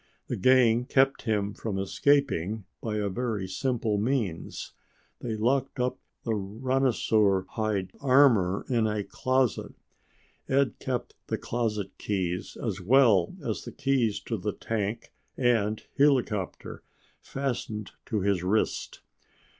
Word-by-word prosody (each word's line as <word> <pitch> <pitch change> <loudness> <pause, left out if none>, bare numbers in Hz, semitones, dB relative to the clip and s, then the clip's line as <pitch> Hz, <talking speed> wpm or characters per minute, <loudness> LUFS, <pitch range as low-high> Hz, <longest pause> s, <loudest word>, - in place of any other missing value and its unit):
The - - -1
gang 120 +1 +4
kept 135 +1 +3
him 105 -3 0
from 105 -3 -4
escaping 105 - +1 0.2
by 110 -2 -3
a 105 -1 0
very 105 -1 -2
simple 110 0 -1
means 110 -7 -2 0.5
they 115 -2 -3
locked 130 +5 0
up 125 0 0 0.2
the 115 - -1
rhinosaur 110 -2 +1
hide 105 -4 -2
armor 125 -9 +4
in 115 -4 +2
a 105 -1 -1
closet. 130 +3 0 0.7
Ed 135 0 +2
kept 125 -2 -3
the - - -1
closet 105 -4 -2
keys, 90 -3 -2
as 105 -5 -3
well 110 -3 +4
as - - -2
the - - -7
keys 130 -6 +1
to 115 - -3
the 100 +2 -3
tank 110 0 -3 0.2
and 110 -4 +1 0.2
helicopter, 125 -9 +1 0.4
fastened 120 -6 -4 0.2
to 105 -3 -1
his 100 -2 +1
wrist. 95 +5 -1
110 Hz, 120 wpm, -28 LUFS, 100-130 Hz, 0.7 s, gang